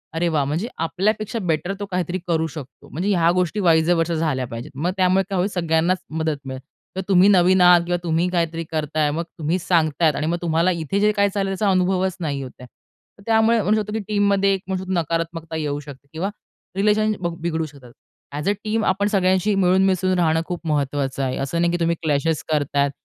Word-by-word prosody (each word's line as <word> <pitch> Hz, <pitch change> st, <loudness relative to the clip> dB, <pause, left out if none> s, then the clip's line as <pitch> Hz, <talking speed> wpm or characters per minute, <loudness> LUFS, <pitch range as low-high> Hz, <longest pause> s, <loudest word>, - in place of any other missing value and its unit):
"अरे 170 Hz, +1 st, +1 dB
वाह! 145 Hz, -2 st, +2 dB
म्हणजे 160 Hz, -, -2 dB
आपल्यापेक्षा 210 Hz, +7 st, -1 dB
बेटर 180 Hz, 0 st, -1 dB
तो 205 Hz, -, -3 dB
काहीतरी 180 Hz, 0 st, -2 dB
करू 160 Hz, -1 st, +1 dB
शकतो." 150 Hz, -3 st, -11 dB
म्हणजे 180 Hz, +7 st, -2 dB
ह्या 170 Hz, -1 st, +3 dB
गोष्टी 180 Hz, +3 st, 0 dB
वाइज 165 Hz, -3 st, +3 dB
अ, -, -, +6 dB
वर्सा 165 Hz, 0 st, 0 dB
झाल्या 150 Hz, -5 st, -1 dB
पाहिजेत. 115 Hz, 0 st, -8 dB
मग 170 Hz, +7 st, -1 dB
त्यामुळे 185 Hz, +1 st, +3 dB
काय 195 Hz, -, -1 dB
होईल 185 Hz, +3 st, +1 dB
सगळ्यांनाच 170 Hz, +1 st, +1 dB, 0.2 s
मदत 155 Hz, -2 st, -1 dB
मिळेल. 130 Hz, 0 st, -6 dB, 0.4 s
तर -, -, 0 dB
तुम्ही 190 Hz, -1 st, +5 dB
नवीन 185 Hz, -1 st, +4 dB
आहात 175 Hz, -1 st, +7 dB
किंवा 175 Hz, 0 st, 0 dB
तुम्ही 165 Hz, +1 st, +1 dB
काहीतरी 165 Hz, -1 st, -1 dB
करत 155 Hz, -2 st, -3 dB
आहे 150 Hz, -1 st, +3 dB
मग 165 Hz, +3 st, -2 dB, 0.2 s
तुम्ही 160 Hz, +3 st, 0 dB
सांगत 165 Hz, -3 st, 0 dB
आहेत 155 Hz, -4 st, +4 dB
आणि 155 Hz, -, -2 dB
मग 170 Hz, +1 st, 0 dB
तुम्हाला 170 Hz, +2 st, +2 dB
इथे 170 Hz, +3 st, -2 dB
जे 210 Hz, +1 st, +4 dB
काही 200 Hz, -1 st, +2 dB
चाललंय 195 Hz, -1 st, -1 dB
त्याचा 210 Hz, -2 st, +2 dB
अनुभवच 185 Hz, 0 st, +1 dB
नाही 145 Hz, -5 st, -3 dB
होत 130 Hz, -, -7 dB
आहे. 125 Hz, -, -11 dB, 0.6 s
त्यामुळे 225 Hz, 0 st, +3 dB
म्हणू 210 Hz, +3 st, +2 dB
शकतो, 210 Hz, +1 st, -6 dB
की 220 Hz, -, -1 dB
टीममध्ये 200 Hz, -1 st, +2 dB
एक 190 Hz, -, -2 dB, 0.3 s
नकारात्मकता 165 Hz, -2 st, -2 dB
येऊ 145 Hz, -2 st, -2 dB
शकते 140 Hz, -1 st, -12 dB
किंवा 180 Hz, +5 st, -2 dB, 0.5 s
रिलेशन 210 Hz, +2 st, +2 dB
बघ 175 Hz, -2 st, -2 dB
बिघडू 160 Hz, -1 st, -1 dB
शकतात. 140 Hz, -5 st, -14 dB, 0.4 s
ॲज 150 Hz, +7 st, -2 dB
अ, -, -, +4 dB
टीम 215 Hz, 0 st, -1 dB
आपण 195 Hz, +2 st, +1 dB
सगळ्यांशी 190 Hz, 0 st, +2 dB
मिळून 190 Hz, 0 st, +3 dB
मिसळून 185 Hz, -1 st, +1 dB
राहणं 160 Hz, -1 st, +2 dB
खूप 175 Hz, 0 st, -5 dB
महत्वाचं 140 Hz, -2 st, -1 dB
आहे. 130 Hz, 0 st, -2 dB
असं 170 Hz, +5 st, -2 dB
नाही, 170 Hz, -, +2 dB
की 175 Hz, -, -1 dB
तुम्ही 170 Hz, 0 st, +1 dB
क्लॅशेस 155 Hz, 0 st, 0 dB
करत 145 Hz, -2 st, -1 dB
आहेत 140 Hz, 0 st, +2 dB
170 Hz, 210 wpm, -22 LUFS, 155-190 Hz, 0.6 s, आहात